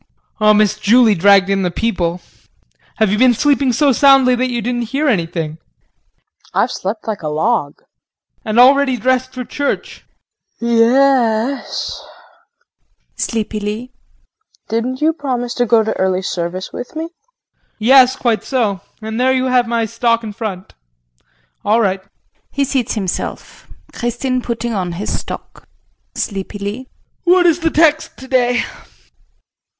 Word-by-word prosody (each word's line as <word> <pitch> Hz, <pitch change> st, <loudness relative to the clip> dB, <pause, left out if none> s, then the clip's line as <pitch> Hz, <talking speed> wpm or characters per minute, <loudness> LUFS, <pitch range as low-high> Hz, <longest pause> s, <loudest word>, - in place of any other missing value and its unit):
Oh, 215 Hz, 0 st, +5 dB
Miss 215 Hz, 0 st, +2 dB
Julie 225 Hz, +1 st, +5 dB
dragged 195 Hz, +1 st, +4 dB
in 195 Hz, 0 st, 0 dB
the 180 Hz, -, 0 dB
people. 180 Hz, -3 st, -2 dB, 0.7 s
Have 220 Hz, -3 st, +1 dB
you 210 Hz, -, 0 dB
been 250 Hz, -2 st, +5 dB
sleeping 275 Hz, 0 st, +2 dB
so 280 Hz, +4 st, +3 dB
soundly 270 Hz, -1 st, +5 dB
that 255 Hz, +1 st, 0 dB
you 240 Hz, -1 st, -2 dB
didn't 240 Hz, 0 st, -3 dB
hear 290 Hz, +3 st, 0 dB
anything? 165 Hz, -, -1 dB
KRISTIN. 160 Hz, -, -36 dB
I've -, -, +2 dB
slept 210 Hz, +4 st, -5 dB
like 215 Hz, -2 st, -3 dB
a 155 Hz, -, -4 dB
log. 155 Hz, 0 st, -1 dB
JEAN. -, -, -34 dB, 0.6 s
And 220 Hz, +1 st, +1 dB
already 265 Hz, 0 st, +5 dB
dressed 255 Hz, +2 st, 0 dB
for 250 Hz, -, -4 dB
church! 285 Hz, +3 st, -4 dB, 0.5 s
KRISTIN. 235 Hz, 0 st, -1 dB
Ye 230 Hz, +3 st, +4 dB
es, 265 Hz, -2 st, 0 dB, 1.1 s
[Sleepily] 215 Hz, +1 st, -3 dB, 0.8 s
didn't 250 Hz, +4 st, -2 dB
you 315 Hz, +1 st, +3 dB
promise 250 Hz, -5 st, -3 dB
to 245 Hz, -1 st, 0 dB
go 225 Hz, 0 st, +4 dB
to 220 Hz, -, -2 dB
early 190 Hz, 0 st, 0 dB
service 180 Hz, +1 st, -4 dB
with 245 Hz, -, -7 dB
me? 320 Hz, -, -3 dB
JEAN. 435 Hz, +9 st, -22 dB
Yes, 255 Hz, +3 st, +5 dB
quite 225 Hz, -4 st, 0 dB
so, 215 Hz, -8 st, -1 dB, 0.2 s
and 220 Hz, +2 st, -3 dB
there 260 Hz, +1 st, +3 dB
you 260 Hz, 0 st, 0 dB
have 245 Hz, -2 st, +3 dB
my 230 Hz, -1 st, 0 dB
stock 230 Hz, +1 st, 0 dB
and 210 Hz, -2 st, -7 dB
front. 195 Hz, -5 st, -6 dB, 0.9 s
All 215 Hz, +3 st, +2 dB
right. 195 Hz, -3 st, 0 dB, 0.5 s
[He 280 Hz, -, -1 dB
seats 265 Hz, -4 st, -1 dB
himself. 195 Hz, -4 st, -5 dB, 0.3 s
Kristin 250 Hz, +2 st, -2 dB
putting 235 Hz, -1 st, -3 dB
on 180 Hz, -4 st, -2 dB
his 200 Hz, +5 st, -3 dB
stock.] -, -, -9 dB, 0.5 s
JEAN -, -, -2 dB
[Sleepily]. 205 Hz, +4 st, -5 dB, 0.4 s
What 360 Hz, 0 st, +4 dB
is 335 Hz, -1 st, +3 dB
the 330 Hz, -1 st, +1 dB
text 315 Hz, 0 st, +2 dB
today? 250 Hz, -2 st, +1 dB
235 Hz, 145 wpm, -17 LUFS, 210-260 Hz, 1.1 s, Oh